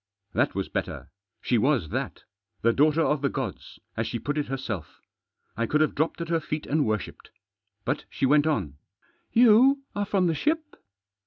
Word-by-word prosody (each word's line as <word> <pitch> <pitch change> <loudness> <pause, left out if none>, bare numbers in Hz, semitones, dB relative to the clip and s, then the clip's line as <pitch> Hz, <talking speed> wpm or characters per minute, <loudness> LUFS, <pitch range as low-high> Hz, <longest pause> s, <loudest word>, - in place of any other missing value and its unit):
That - - +1
was - - -1
better. - - -4 0.3
She 120 - +2
was 130 - +2
that. - - -4 0.4
The 115 +1 +4
daughter 155 +4 +3
of 150 -2 +1
the 140 - +1
gods 130 -8 -5
— - - -48
as - - -1
she - - -2
put 145 - -3
it 150 -1 -1
herself. 120 - -5 0.6
I 115 +1 -1
could 150 - +2
have 155 - +2
dropped 160 +3 -1
at 170 - -4
her 165 -1 +2
feet 150 0 -4
and 150 -2 +1
worshipped. 110 -2 -3 0.6
But 140 +4 -1
she - - -1
went 145 +3 +4
on: 95 - -1 0.3
" - - -39
You 255 +4 +6
are 205 0 0
from 190 -2 +2
the 170 - +2
ship 305 - -1
150 Hz, 190 wpm, -26 LUFS, 130-165 Hz, 0.6 s, You